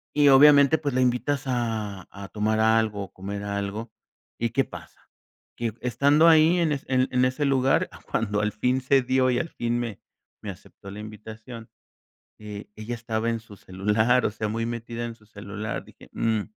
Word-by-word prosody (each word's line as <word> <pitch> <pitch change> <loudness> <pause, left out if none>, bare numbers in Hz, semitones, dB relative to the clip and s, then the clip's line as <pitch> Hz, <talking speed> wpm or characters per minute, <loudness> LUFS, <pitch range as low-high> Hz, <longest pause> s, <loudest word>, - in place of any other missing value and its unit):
y 145 -1 +5
obviamente, 140 +2 +7
pues, 145 -3 -2
la 130 - +3
invitas 130 +3 0
a 110 -7 -3
a 100 0 -9
tomar 110 +1 0
algo, 110 -2 +2
o 95 - -20
comer 100 +2 -6
algo 100 +2 -4 0.5
y, 115 - 0
¿qué 135 +4 +1
pasa? - - -13 0.5
Que 115 -2 -3
estando 140 +6 +4
ahí, 160 +2 +6
en 165 -3 +2
en 130 -2 0
en 125 0 +3
ese 130 +3 0
lugar, 135 -1 +2 0.2
cuando 105 -2 0
al 105 0 0
fin 125 +4 0
se 135 +1 +3
dio 130 +1 +2
y 125 - +1
al 170 - -3
fin 120 -3 -2
me 115 -4 -4 0.4
me 105 - -6
aceptó 100 +1 -13
la 100 - -8
invitación. 110 +2 -10 0.7
Eh, 105 -1 -8
ella 110 +3 -5
estaba 115 -1 -2
en 115 0 -1
su 110 -2 -14
celular, 105 +7 +1
o - - +1
sea, 110 +1 -3
muy 115 +2 -2
metida 115 0 -4
en 115 -1 -6
su 110 -2 -24
celular, 105 0 -6
dije: - - -17
"Mm, 110 -2 0
115 Hz, 185 wpm, -25 LUFS, 105-130 Hz, 0.7 s, obviamente